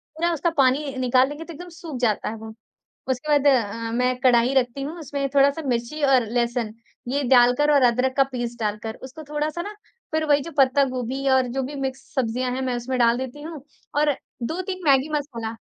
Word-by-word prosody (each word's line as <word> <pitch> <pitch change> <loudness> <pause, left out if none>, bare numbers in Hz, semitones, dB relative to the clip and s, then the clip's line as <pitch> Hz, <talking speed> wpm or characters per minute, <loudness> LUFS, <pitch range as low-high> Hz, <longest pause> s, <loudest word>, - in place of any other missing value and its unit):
पूरा 340 +2 +1
उसका 330 +2 0
पानी 270 +1 +2
निकाल 255 +1 +3
लेंगे, 295 +3 -7
तो 335 - -9
एकदम 355 +4 -10
सूख 325 -5 -8
जाता 220 -5 0
है 225 - -5
वो। 220 0 -9 0.6
उसके 260 +4 -2
बाद 285 - -3
अ, 230 -3 +2
मैं 250 +1 +1
कढ़ाई 250 0 +4
रखती 260 +1 +1
हूँ, 315 +5 -5
उसमें 280 -2 -3
थोड़ा-सा 280 +3 +4
मिर्ची 240 +5 -2
और 260 -4 +4
लहसुन, 235 -2 -1 0.3
ये 280 +3 0
डालकर 250 +4 +5
और 280 - +4
अदरक 250 +2 +2
का 275 - +6
पीस 240 -1 -3
डालकर, 215 +1 -3
उसको 270 +5 -9
थोड़ा-सा 305 +3 -2
ना, 415 +2 -7 0.4
फिर 315 0 +1
वही 290 -1 +4
जो 335 - -7
पत्ता 275 +1 +5
गोभी 260 +3 -2
और 260 -1 +4
जो 270 - +1
भी 275 +3 -5
मिक्स 265 -1 -3
सब्ज़ियाँ 250 -1 -1
हैं, 260 +1 -2
मैं 255 -1 -1
उसमें 250 +2 -3
डाल 235 0 +4
देती 260 +3 -6
हूँ, 310 -3 -8 0.3
और 295 -1 +2 0.3
2-3 370 +8 -3
मैगी 270 +1 +4
मसाला। 230 -6 -6
260 Hz, 200 wpm, -23 LUFS, 245-290 Hz, 0.6 s, का